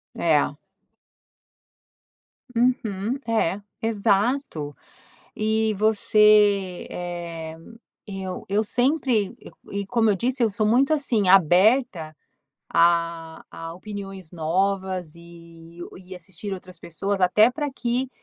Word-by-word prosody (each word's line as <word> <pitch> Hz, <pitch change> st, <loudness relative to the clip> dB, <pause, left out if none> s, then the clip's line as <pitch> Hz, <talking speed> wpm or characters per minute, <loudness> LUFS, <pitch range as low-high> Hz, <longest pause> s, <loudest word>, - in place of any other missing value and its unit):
É. 155 Hz, -4 st, +2 dB, 2.1 s
Uhum. 235 Hz, -1 st, 0 dB
É. 205 Hz, -4 st, 0 dB, 0.2 s
Exato. 210 Hz, -, 0 dB, 0.6 s
E 220 Hz, 0 st, 0 dB
você 210 Hz, -2 st, +3 dB
eh 170 Hz, -2 st, -6 dB, 0.5 s
eu 190 Hz, -2 st, -6 dB
eu 210 Hz, +2 st, +1 dB
sempre 245 Hz, -3 st, +1 dB
e -, -, -13 dB, 0.3 s
e 200 Hz, -, -5 dB
como 225 Hz, -1 st, +2 dB
eu 200 Hz, -, +1 dB
disse 250 Hz, +4 st, -1 dB
eu 225 Hz, -, +3 dB
sou 210 Hz, +2 st, -1 dB
muito, 260 Hz, +7 st, +3 dB
assim, 235 Hz, -10 st, +1 dB
aberta 185 Hz, -, +4 dB, 0.6 s
a 170 Hz, -1 st, +1 dB
a 165 Hz, 0 st, -7 dB
opiniões 195 Hz, -2 st, -8 dB
novas 185 Hz, 0 st, -1 dB
e 170 Hz, 0 st, -15 dB, 0.2 s
e 185 Hz, +1 st, -10 dB
assistir 190 Hz, +3 st, -6 dB
outras 185 Hz, -1 st, -10 dB
pessoas, 195 Hz, +4 st, -3 dB
até 210 Hz, +6 st, +5 dB
pra 290 Hz, +2 st, -3 dB
que 250 Hz, +1 st, -2 dB
195 Hz, 105 wpm, -24 LUFS, 170-220 Hz, 2.1 s, até